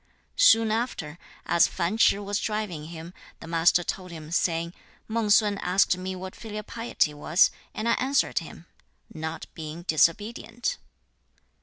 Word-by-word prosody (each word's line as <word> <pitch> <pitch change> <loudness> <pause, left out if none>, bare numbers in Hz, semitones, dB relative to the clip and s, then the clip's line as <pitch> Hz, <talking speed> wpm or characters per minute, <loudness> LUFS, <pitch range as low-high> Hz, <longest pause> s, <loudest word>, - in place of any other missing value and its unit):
2. - - -1
Soon 225 - +6
after, 195 -9 -3 0.3
as 170 - +4
Fan 170 +5 -2
Ch'ih 205 -2 +3
was 205 0 -1
driving 210 -8 -3
him, 165 +1 -9 0.3
the - - -10
Master 165 +1 +3
told 185 +1 -4
him, 160 -2 -9
saying, 170 -1 0 0.3
'Mang 225 -1 -1
sun 205 -1 +4
asked 180 +1 +3
me 185 +1 -5
what 185 0 -8
filial 215 -2 -7
piety 230 -9 -1
was, 155 +4 +3 0.2
and 215 - -2
I 235 - +4
answered 270 +2 +1
him, - - -11 0.5
"not 160 +1 -5
being 160 +1 -7
disobedient."' 215 - 0
185 Hz, 150 wpm, -26 LUFS, 165-215 Hz, 0.5 s, Soon